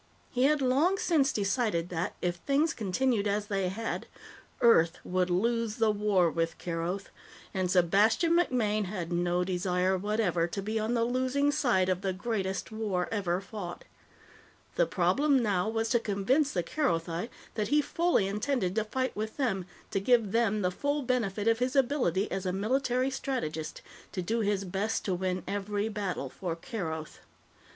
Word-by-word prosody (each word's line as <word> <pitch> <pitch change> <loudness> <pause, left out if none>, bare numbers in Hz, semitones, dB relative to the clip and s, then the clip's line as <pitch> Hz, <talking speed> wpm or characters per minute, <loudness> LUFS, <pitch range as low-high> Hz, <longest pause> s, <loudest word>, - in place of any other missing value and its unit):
He 255 0 +2
had 295 -1 +3
long 290 +10 +3
since 300 -7 +2
decided 200 -4 0
that, 170 0 -2
if 175 -1 0
things 290 - +1
continued 215 +1 0
as 205 +1 0
they 195 -3 -1
had, 225 +5 -4 0.5
Earth 170 -9 +5
would 185 0 0
lose 230 +4 +1
the 225 -2 +3
war 205 -5 +2
with 165 0 -1
Keroth, 175 +3 -3 0.4
and 185 -2 0
Sebastian 200 - +3
MacMaine 230 - +2
had 180 -3 -5
no 175 +1 +1
desire 180 0 +1
whatever 200 -4 +1
to 175 - -5
be 215 +3 -2
on 220 +3 0
the 230 - +2
losing 260 +4 +1
side 240 -11 +2
of 185 0 0
the 190 -1 -1
greatest 195 -1 -3
war 205 -5 -2
ever 185 -5 0
fought. 195 -3 -7 0.9
The - - +2
problem 285 0 +2
now 205 -1 +1
was 225 0 -1
to 235 - +3
convince 240 +8 +1
the 175 - -1
Kerothi 170 - -1 0.2
that 215 -2 -1
he 295 - +3
fully 335 - +1
intended 210 -1 -1
to 220 +1 +1
fight 255 +4 -2
with 215 +1 -4
them, 200 -10 -1 0.2
to 195 - +1
give 225 -1 +3
them 215 -2 +1
the 180 - +1
full 285 +8 -1
benefit 225 -5 -1
of 230 0 +3
his 255 +2 0
ability 245 - +1
as 190 -1 -2
a - - +1
military 255 +6 0
strategist, 160 - -3 0.3
to 185 - -2
do 225 +6 0
his 205 -2 0
best 195 +4 -2
to 190 - 0
win 185 0 -2
every 205 +2 -2
battle 195 -10 -3
for 175 0 -4
Keroth. 160 -4 -5
210 Hz, 165 wpm, -29 LUFS, 185-245 Hz, 0.9 s, Earth